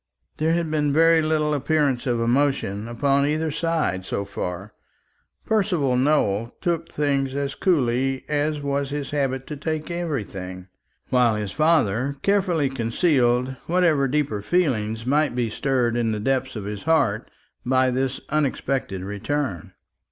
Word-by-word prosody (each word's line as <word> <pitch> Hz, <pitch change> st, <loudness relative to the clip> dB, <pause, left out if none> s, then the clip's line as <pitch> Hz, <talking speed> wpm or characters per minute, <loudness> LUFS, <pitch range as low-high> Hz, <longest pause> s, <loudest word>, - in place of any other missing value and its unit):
There 160 Hz, +2 st, +1 dB
had 170 Hz, -2 st, -1 dB
been 150 Hz, -2 st, +1 dB
very 165 Hz, +2 st, +5 dB
little 155 Hz, -1 st, +1 dB
appearance 140 Hz, -3 st, +1 dB
of 120 Hz, -2 st, +1 dB
emotion 115 Hz, -4 st, 0 dB
upon 140 Hz, +4 st, +1 dB
either 155 Hz, +1 st, 0 dB
side 160 Hz, -, -1 dB
so 100 Hz, +1 st, -3 dB
far. 100 Hz, 0 st, -5 dB, 0.7 s
Percival 180 Hz, -12 st, +1 dB
Nowell 120 Hz, -5 st, +1 dB
took 165 Hz, -1 st, -2 dB
things 140 Hz, -2 st, 0 dB
as 140 Hz, 0 st, -2 dB
coolly 135 Hz, -6 st, +1 dB
as 150 Hz, +1 st, 0 dB
it 145 Hz, -, -8 dB
was 140 Hz, 0 st, -1 dB
his 145 Hz, -1 st, -4 dB
habit 135 Hz, -3 st, -1 dB
to 150 Hz, -, -6 dB
take 155 Hz, +3 st, -3 dB
everything, 100 Hz, -, -4 dB, 0.4 s
while 125 Hz, -3 st, +3 dB
his 105 Hz, -2 st, -3 dB
father 140 Hz, -4 st, +2 dB
carefully 185 Hz, -7 st, +2 dB
concealed 125 Hz, 0 st, +1 dB
whatever 165 Hz, -6 st, +3 dB
deeper 135 Hz, -7 st, -1 dB
feeling 115 Hz, -, 0 dB
might 145 Hz, +1 st, +1 dB
be 120 Hz, -3 st, -1 dB
stirred 125 Hz, -2 st, 0 dB
in 115 Hz, -2 st, +1 dB
the 105 Hz, -, -2 dB
depths 130 Hz, +3 st, -1 dB
of 105 Hz, -, -4 dB
his 105 Hz, -1 st, -5 dB
heart 130 Hz, -10 st, +1 dB, 0.3 s
by 130 Hz, 0 st, +2 dB
this 130 Hz, +1 st, -1 dB
unexpected 135 Hz, -9 st, -1 dB
return. 105 Hz, -, -3 dB
135 Hz, 145 wpm, -23 LUFS, 120-155 Hz, 0.7 s, very